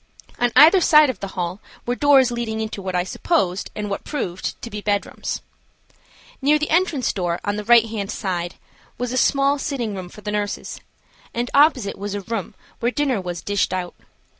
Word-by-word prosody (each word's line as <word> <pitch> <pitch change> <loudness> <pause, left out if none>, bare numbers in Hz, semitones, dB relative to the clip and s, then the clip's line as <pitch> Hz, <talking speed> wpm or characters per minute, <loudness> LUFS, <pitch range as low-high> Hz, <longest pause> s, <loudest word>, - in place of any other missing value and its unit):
On 245 0 +2
either 320 +8 +8
side 305 -4 +6
of - - -15
the 200 - -4
hall 180 +2 -2 0.3
were 245 - 0
doors 270 -2 +4
leading 235 -2 -3
into 220 -2 -4
what 185 -1 -4
I 180 - +2
supposed 190 - -1
and 210 -1 -3
what 200 - -4
proved 190 - -4
to 235 - -6
be 210 - -5
bedrooms. 205 -1 -2 1.0
Near 295 +3 +4
the 300 0 -3
entrance 330 -6 +2
door, 175 -3 -1
on 205 - -1
the 210 - -4
right 235 +1 +6
hand 215 -3 -4
side, 180 -5 -3 0.4
was 245 0 -3
a - - -1
small 275 +2 +3
sitting 245 -7 -3
room 185 -2 -6
for 210 - -13
the 210 - -4
nurses, 205 -1 -3 0.6
and 240 +1 -2
opposite 280 -7 +4
it - - -13
was 205 0 -4
a 205 - -3
room 210 -2 -5 0.2
where 240 +1 +1
dinner 270 -7 0
was 175 -2 -5
dished 200 -2 0
out. 180 -1 -4
220 Hz, 195 wpm, -22 LUFS, 195-270 Hz, 1.0 s, either